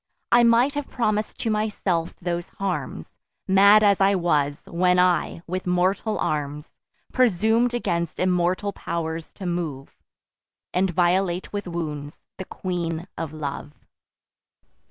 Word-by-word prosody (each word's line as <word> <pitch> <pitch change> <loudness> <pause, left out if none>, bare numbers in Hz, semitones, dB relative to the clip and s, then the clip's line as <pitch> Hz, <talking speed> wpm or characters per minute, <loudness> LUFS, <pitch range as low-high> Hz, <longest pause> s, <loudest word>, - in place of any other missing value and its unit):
I 240 - +7
might 235 +4 +4
have 290 -1 -3
promis'd 215 -3 -1
to 225 - 0
myself 200 -6 -1
those 175 -1 -3
harms, 195 -2 -4 0.4
Mad 200 +2 +6
as 200 -2 +4
I 195 +1 +4
was, 145 -5 0
when 180 +1 +2
I, 180 -1 +2
with 185 +1 -4
mortal 185 +4 +1
arms, 150 0 -3 0.4
Presum'd 230 +1 +3
against 170 -8 -2
immortal 185 +2 +1
pow'rs 165 -2 -4
to 195 - -8
move, 165 -6 -4 0.8
And 190 +1 +2
violate 180 +1 +1
with 205 -2 -4
wounds 150 -4 -5 0.2
the 190 - -5
Queen 170 -3 -4
of 165 -3 -4
Love. 150 -1 -6
180 Hz, 125 wpm, -24 LUFS, 165-200 Hz, 0.8 s, I